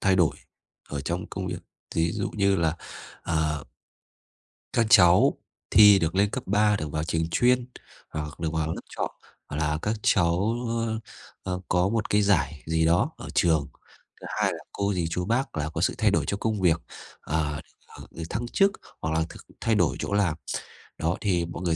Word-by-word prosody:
thay 95 -1 +3
đổi 85 -5 +3 0.5
ở 70 - -3
trong 85 +5 -3
công 95 -1 -5
việc, 90 -1 -3 0.4
ví 85 +1 +1
dụ - - -2
như 100 -2 +3
là, 80 -1 +1 0.5
à 80 -2 0 1.2
các 115 - +3
cháu 90 0 +6 0.3
thi 105 -2 +8
được 80 +2 -1
lên 100 +1 +3
cấp 130 +2 -4
3, 105 +2 +3
được 75 -6 -4
vào 75 0 -1
trường 80 0 -1
chuyên, 125 +3 +3 0.4
hoặc 75 0 -6
được 80 -1 -2
vào 80 -1 0
lớp - - -7
chọn, - - -3 0.4
gọi 75 +1 -3
là, 75 0 +1
các 105 +2 0
cháu, 90 +6 +2
ơ, 115 -1 -1 0.4
ơ, 90 -1 -2
có 90 +1 +2
một 110 0 -1
cái 105 0 +3
giải 80 -8 +1
gì 80 0 +1
đó 85 +2 +3
ở - - -8
trường, 80 -4 +3 0.5
thứ - - -7
hai - - +3
là - - -7
cô 100 0 -1
dì 85 -3 -1
chú 90 +2 -2
bác 115 -3 -1
là 75 0 -1
có - - -4
sự - - +2
thay - - +3
đổi - - +2
cho 100 - -1
công 110 -2 -1
việc, 85 -2 +3 0.4
à, 75 -1 -2 0.3
ờ, - - -12
được 85 - -7
thăng 120 +4 -2
chức 195 +10 +3 0.3
hoặc 80 - -2
là 80 - +2
th - - -13 0.3
thay 115 - +2
đổi 85 -9 +2
chỗ - - -3
làm. 95 -6 +2 0.6
Đó, 85 +2 0
thì 90 -5 +1
mọi 85 - -7
người 85 -2 +1
90 Hz, 200 wpm, -26 LUFS, 80-105 Hz, 1.2 s, thi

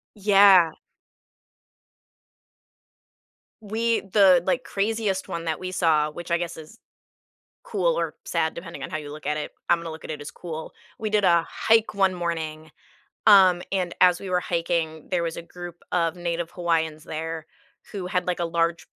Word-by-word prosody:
Yeah. 195 -4 +6 2.9
We 225 +2 0
the, 190 -3 +5
like, 255 -1 0
craziest 205 -2 -1
one 170 0 -5
that 160 - -2
we 185 0 -5
saw- 155 -4 +2
which 175 +2 -9
I 170 - +4
guess 170 -1 -5
is 160 +8 -12 0.9
cool - - 0
or - - -2
sad 160 - 0
depending 170 -5 -8
on - - -5
how - - -3
you 145 -1 -8
look 155 0 -10
at 150 0 0
it, 150 - -5 0.2
I'm 170 -1 +3
gonna 165 -1 -6
look 160 - -10
at - - -5
it 150 - -6
as 145 - -7
cool- 160 -2 -7 0.3
we 215 -1 -2
did 210 -1 +2
a 170 -2 +4
hike 225 -1 +2
one 195 -1 +2
morning, 160 -3 -4 0.5
um, 190 -4 +7
and 180 -3 -1
as 180 -1 +6
we 195 - -7
were 180 0 +2
hiking, 165 -3 -2
there 175 -2 0
was 165 -1 -3
a - - -4
group 175 0 -10
of 165 -1 +1
native 170 -1 -3
Hawaiians 160 -3 -1
there 160 0 -5 0.4
who 195 -4 -5
had, 180 0 -1
like, 180 -1 -1
a 170 - 0
large, 165 0 0
175 Hz, 175 wpm, -25 LUFS, 160-190 Hz, 2.9 s, um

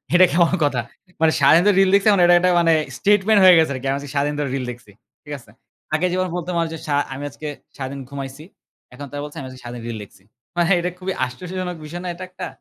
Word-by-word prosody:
এটা 185 - +8
কেমন 170 +1 +3
কথা? 130 -5 +1 0.4
মানে 160 -1 +5
সারাদিন 150 +5 +6
ধরে 205 - +4
রিল 190 - +4
দেখছি 200 +2 +2
এখন 195 -3 +3
এটা 175 - +6
একটা 180 +1 +2 0.5
statement 205 +4 +3
হয়ে 185 -1 +9
গেছে 160 -3 +3
আরকি। 130 +1 -6
আমি 135 - 0
আজকে 140 -1 -9
সারাদিন 145 +1 0
ধরে 140 -3 -1
রিল 130 -2 -3
দেখছি। 120 -4 -14 0.3
ঠিক 150 - -8
আছে? 120 - -20 0.5
আগে 170 +4 +1
যেমন 185 0 0
বলতাম 180 +1 -3
না - - +2
যে - - -5
সা 145 - +1 0.2
আমি 140 +2 -7
আজকে 155 +2 -9 0.3
সারাদিন 135 0 -5
ঘুমাইছি। 140 +1 -7 0.5
এখন 145 +3 -8
তারা 145 0 -5
বলছে 150 +2 -9
আমি 135 - -7
আজকে 130 -1 -12
সারাদিন 120 -1 -8
রিল 115 - -4
লিখছি। 95 -1 -18 0.3
মানে 170 -1 +2
এটা 175 - -1
খুবই 185 0 -3
আশ্চর্যজনক 180 +6 -6
বিষয় 175 +3 -7
না 180 - -5
এটা 185 - -8
একটা! 180 -1 -7
155 Hz, 235 wpm, -21 LUFS, 135-180 Hz, 0.5 s, হয়ে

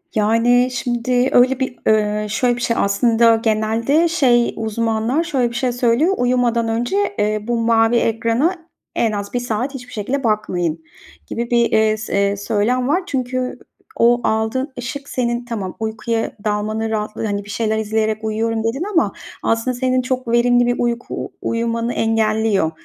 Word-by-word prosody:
Yani, 230 +4 +3
şimdi 245 +1 0
öyle 255 +1 +4
bir, 260 -2 -2
eee, 210 -1 +2
şöyle 240 +3 +1
bir 240 - -7
şey, 230 -1 0
aslında 230 +3 +3
genelde 225 +8 +1
şey 255 -8 +2
uzmanlar 225 +5 0
şöyle 270 -7 0
bir 235 - -9
şey 250 +1 0
söylüyor, 245 +8 +2
"Uyumadan 245 -2 +1
önce, 235 +9 -1 0.2
eee, 210 +1 +1
bu 240 0 0
mavi 225 0 +3
ekrana 230 - +1 0.4
en 225 - +1
az 200 -1 -5
1 245 - 0
saat 245 +3 -2
hiçbir 250 -2 -9
şekilde 255 +6 -2
bakmayın." 175 -7 -1 0.4
gibi 235 0 -4
bir, 235 -1 +3
eee, 220 0 +3
s 200 -2 0
söylem 230 +5 0
var. 355 +7 +1
Çünkü 255 -1 -2 0.4
o 240 +1 +4
aldığın 220 +6 -1
ışık 275 +3 -6
senin 240 -1 -1
tamam 210 -6 -5
uykuya 225 +1 -2
dalmanın 215 +1 -1
rahatlığı 215 0 -3
Hani, 205 -1 -2
bir - - -13
şeyler 220 0 -1
izleyerek 220 0 -1
uyuyorum 220 +1 -1
dedin 235 +8 -1
ama 335 - +2 0.3
aslında 225 +3 0
senin 255 0 +1
çok 255 0 -3
verimli 245 +1 +3
bir 245 0 +1
uyku 240 0 -2
u - - -11
uyumanı 230 +1 -1
engelliyor. 220 -5 +1
230 Hz, 160 wpm, -19 LUFS, 220-245 Hz, 0.4 s, öyle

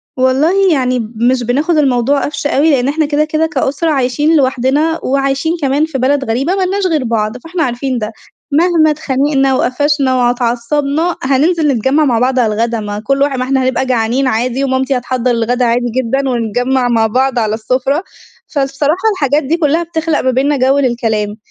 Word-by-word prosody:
والله 310 +10 +2
يعني 255 -2 0 0.2
مش 245 +3 +1
بناخد 290 +8 0
الموضوع 275 -1 +1
قفش 290 0 -3
أوي؛ 280 - 0
لأن 260 -2 +1
إحنا 310 +2 0
كده 295 +1 0
كده 310 +1 0
كأسرة 290 +2 -1
عايشين 290 +3 +1
لوحدنا 275 +4 +1
وعايشين 275 +4 0
كمان 280 +3 +1
في 320 -4 -5
بلد 270 +2 +1
غريبة 270 +11 0
مالناش 385 0 0
غير 310 -5 0
بعض، 225 0 -2
فإحنا 330 +5 -3
عارفين 255 0 -2
ده، 215 -1 -4 0.4
مهما 320 0 +3
اتخانقنا 275 -2 0
وقفشنا 275 0 +1
وع 245 -1 +2
اتعصبنا، 275 +7 -1
هننزل 300 +5 +1
نتجمع 275 +4 +1
مع 240 -5 +1
بعض 255 +1 +1
على 220 -3 +1
الغدا، 230 +1 -1
ما 205 -1 -5
كل 275 +5 -1
واحد 280 -2 +1
ما 255 - -1
إحنا 265 0 0
هنبقى 260 0 0
جعانين 250 +2 0
عادي، 250 +3 -1
ومامتي 265 0 0
هتحضر 250 0 -1
الغدا 240 +2 0
عادي 240 +1 0
جدًا، 265 +2 0
ونتجمع 245 +2 0
مع 225 -2 +2
بعض 255 +2 0
على 215 -1 0
السفرة. 260 - -1 0.5
فالصراحة 295 +6 0
الحاجات 290 -3 +1
دي 310 +5 0
كلها 325 +1 +1
بتخلق 325 -2 -2
ما 260 - +1
بينّا 275 +3 +1
جو 265 +2 +2
للكلام، 220 -5 -1
265 Hz, 175 wpm, -14 LUFS, 245-295 Hz, 0.5 s, مهما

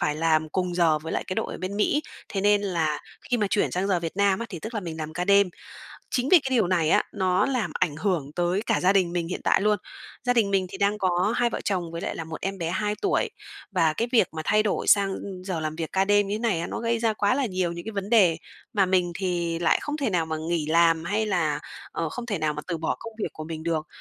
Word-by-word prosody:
phải 150 - +1
làm 155 0 +2
cùng 180 +1 -1
giờ 165 -3 +3
với 160 +1 -6
lại - - -1
cái 185 - -3
đội - - -2
ở - - -7
bên 185 +2 -4
Mỹ, 290 +8 +2 0.3
thế 195 - -2
nên 205 +1 +3
là 160 -6 0 0.3
khi 245 - +3
mà 210 -3 +1
chuyển 205 - +2
sang 185 +2 -1
giờ 185 -3 +2
Việt 165 +1 -5
Nam 200 -1 +3
á, 235 - -4
thì 180 - -6
tức 220 +8 -7
là 215 - -1
mình 165 -3 -6
làm 155 0 -5
ca 180 +2 -2
đêm. 200 0 +5 0.6
Chính 255 +2 0
vì 365 - +8
cái 270 - -4
điều 215 -7 +3
này 170 -4 +2
á, - - +4
nó 185 -2 +2
làm 255 -5 -1
ảnh 165 -5 0
hưởng 160 -5 -1
tới 175 +3 +1
cả 225 - +2
gia 185 +2 +4
đình 185 -3 +2
mình 170 -1 -1
hiện 180 - -4
tại - - +3
luôn, 210 +1 +3 0.5
gia 245 0 +2
đình 215 -5 +2
mình 190 -1 +2
thì 195 - -8
đang 200 +1 +1
có 185 +2 +1
hai 240 -1 +3
vợ - - -4
chồng 180 -4 -1
với 170 0 -5
lại - - -3
là - - -4
một 160 0 -8
em 195 0 -3
bé 170 -2 -2
2 210 +3 -1
tuổi, 410 +4 +1 0.4
và 165 -5 +2
cái 230 +9 -1
việc 225 -8 +4
mà 160 - -3
thay 215 0 +3
đổi 210 - -1
sang 200 -1 +4 0.3
giờ 185 -4 -3
làm 155 0 -3
việc 160 -1 -4
ca 190 0 +2
đêm 205 0 +3
như 205 - -1
thế - - -4
này 220 -8 +1
á, 170 - -3
nó - - -4
gây 230 0 0
ra 225 -1 +1
quá 205 +3 +1
là 275 -1 +1
nhiều 185 -4 -1
những 170 +1 -7
cái 220 - -4
vấn 200 -1 -4
đề 190 -9 +5 0.4
mà 200 -2 +4
mình 180 -1 +1
thì 175 -3 -1
lại 170 - +3
không 295 +1 -3
thể 275 -7 0
nào 170 -4 +1
mà 160 0 -3
nghỉ 170 -3 0
làm 165 +1 +3
hay 210 +5 0
là, 170 -8 0 0.3
ờ, 165 -2 -2
không 245 +6 -6
thể 215 -4 -2
nào 155 -1 0
mà 150 - -5
từ 170 -3 -2
bỏ 160 - -1
công 225 -1 -8
việc - - -1
của 155 - -7
mình 160 0 -6
được. 160 -2 -1
185 Hz, 285 wpm, -25 LUFS, 165-210 Hz, 0.6 s, vì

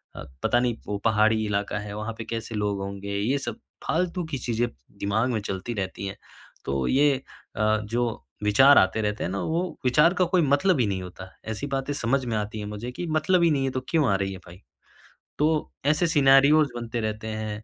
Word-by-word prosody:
अ, - - -7 0.2
पता 120 - +3
नहीं 120 -2 0
वो 105 - -2
पहाड़ी 110 0 +3
इलाका 105 0 -1
है, 105 0 -7
वहाँ 110 +2 -4
पे 115 - -5
कैसे 115 -1 -5
लोग 105 -1 -1
होंगे? 100 +1 -5
ये 120 +8 +1
सब - - -4 0.3
फ़ालतू 180 +2 0
की 135 - -1
चीज़ें 120 -1 -1 0.3
दिमाग 110 +5 +1
में 110 - 0
चलती 100 +3 -4
रहती 100 0 -4
हैं। 95 - -6 0.5
तो 70 -2 -1
ये 145 +2 +4 0.5
अ, - - -1 0.2
जो 115 +1 -2 0.2
विचार 135 +8 +6
आते 95 +4 +4
रहते 105 0 -2
हैं 90 - -2
ना 100 - -2
वो 170 +3 -1 0.2
विचार 150 +7 +5
का 185 -1 +2
कोई 180 - +5
मतलब 145 +3 +3
ही 115 - +3
नहीं 95 -2 -2
होता। 90 +1 -9 0.2
ऐसी 110 +6 -4
बातें 135 +1 -2
समझ 135 0 0
में 115 -3 -1
आती 105 +1 -4
हैं 105 - -5
मुझे 105 +4 -6
कि 175 +7 -5
मतलब 170 +3 +2
ही 165 - +4
नहीं 140 -3 +1
है 135 - -1
तो 130 - -3
क्यों 155 -4 +2
आ 100 - +3
रही 95 0 -2
है 95 - -9
भई? 90 +3 -13 0.8
तो 155 +1 +1
ऐसे 155 +4 +3
सिनेरियोज़ 140 0 +5
बनते 120 0 -4
रहते 110 0 -3
हैं। 110 0 -4
115 Hz, 215 wpm, -25 LUFS, 105-140 Hz, 0.8 s, विचार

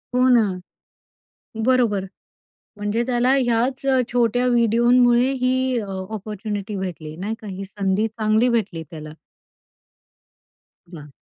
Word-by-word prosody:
हो 250 +1 +4
ना, 240 -2 +6 1.2
बरोबर. 235 -7 +2 0.7
म्हणजे 205 +3 -1
त्याला 250 +1 +2
ह्याच 250 +1 0
अ, 260 -1 +3
छोट्या 245 0 +1
व्हिडिओमुळे 240 +2 +3
ही 255 0 +2 0.3
अ, 210 - -5 0.3
अपॉर्च्युनिटी 210 0 -5
भेटली 170 -5 -6
नाही 205 +6 -4
का? 215 - -9
ही 195 0 -6
संधी 200 +1 -1
चांगली 220 +2 +1
भेटली 185 -7 -4
त्याला. 155 -2 -9 1.8
वाह! 150 -5 -11
220 Hz, 110 wpm, -22 LUFS, 195-245 Hz, 1.8 s, ना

